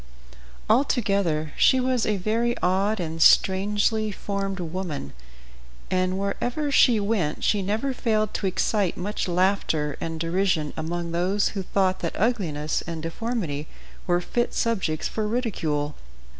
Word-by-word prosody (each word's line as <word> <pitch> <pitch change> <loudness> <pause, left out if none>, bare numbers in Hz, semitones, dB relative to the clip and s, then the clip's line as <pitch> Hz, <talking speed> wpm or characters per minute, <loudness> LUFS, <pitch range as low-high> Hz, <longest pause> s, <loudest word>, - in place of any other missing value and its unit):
Altogether 200 - +1
she 260 - +5
was 255 -2 +1
a 210 -1 +1
very 230 +5 0
odd 195 +4 +2
and 165 -1 -4
strangely 205 +5 +4
formed 195 -1 -3
woman, 165 - -4 0.8
and 185 0 +1
wherever 245 +9 -2
she 245 -5 +5
went 200 -7 -1
she 205 - +2
never 220 +8 -1
failed 215 -4 0
to 195 - -1
excite 190 0 0
much 200 +3 -3
laughter 175 -5 +1
and 165 -1 -4
derision 170 -2 0
among 170 +1 -3
those 185 +4 +1
who 200 - -4
thought 190 0 0
that 170 - -4
ugliness 175 -10 0
and 165 -2 -5
deformity 165 -5 -3 0.4
were 175 -1 +3
fit 240 +6 -1
subjects 190 -9 0
for 215 -1 -2
ridicule. 165 - -1
190 Hz, 130 wpm, -25 LUFS, 165-215 Hz, 0.8 s, she